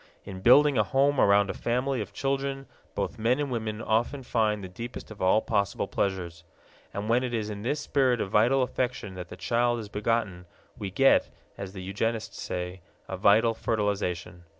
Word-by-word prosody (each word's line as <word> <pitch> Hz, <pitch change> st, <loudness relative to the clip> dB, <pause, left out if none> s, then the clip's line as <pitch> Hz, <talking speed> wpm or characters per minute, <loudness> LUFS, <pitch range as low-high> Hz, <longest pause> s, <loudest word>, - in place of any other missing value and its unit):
In 95 Hz, -2 st, -8 dB
building 140 Hz, +4 st, +6 dB
a -, -, +5 dB
home 135 Hz, +6 st, +2 dB
around 100 Hz, 0 st, +4 dB
a -, -, -7 dB
family 125 Hz, +1 st, -1 dB
of 100 Hz, -, -6 dB
children 135 Hz, 0 st, -2 dB, 0.3 s
both 115 Hz, -, -3 dB
men 120 Hz, +5 st, +2 dB
and 145 Hz, -2 st, -2 dB
women 110 Hz, -2 st, -3 dB
often 120 Hz, +5 st, 0 dB
find 105 Hz, -4 st, 0 dB
the -, -, -5 dB
deepest 115 Hz, +6 st, -8 dB
of 110 Hz, -, -10 dB
all 95 Hz, +4 st, +3 dB
possible 100 Hz, -4 st, 0 dB
pleasures. 85 Hz, -4 st, -2 dB, 0.5 s
And 100 Hz, +1 st, -4 dB
when 120 Hz, +3 st, +2 dB
it 120 Hz, -2 st, -2 dB
is 110 Hz, -1 st, -2 dB
in 100 Hz, -1 st, -6 dB
this 140 Hz, +7 st, -1 dB
spirit 130 Hz, -4 st, +2 dB
of 95 Hz, -, -3 dB
vital 125 Hz, +5 st, +4 dB
affection 125 Hz, -5 st, -3 dB
that 90 Hz, -2 st, -8 dB
the 90 Hz, -, -9 dB
child 120 Hz, +6 st, +1 dB
is 110 Hz, -3 st, -7 dB
begotten, 105 Hz, -4 st, -1 dB, 0.3 s
we 100 Hz, -, -5 dB
get, 135 Hz, +8 st, +4 dB, 0.3 s
as 100 Hz, -1 st, -7 dB
the 95 Hz, -2 st, -7 dB
eugenists 110 Hz, +4 st, -3 dB
say, 90 Hz, +1 st, -4 dB, 0.3 s
a 95 Hz, -, -4 dB
vital 105 Hz, +4 st, +4 dB
fertilization. 100 Hz, -6 st, -2 dB
110 Hz, 185 wpm, -27 LUFS, 95-125 Hz, 0.5 s, building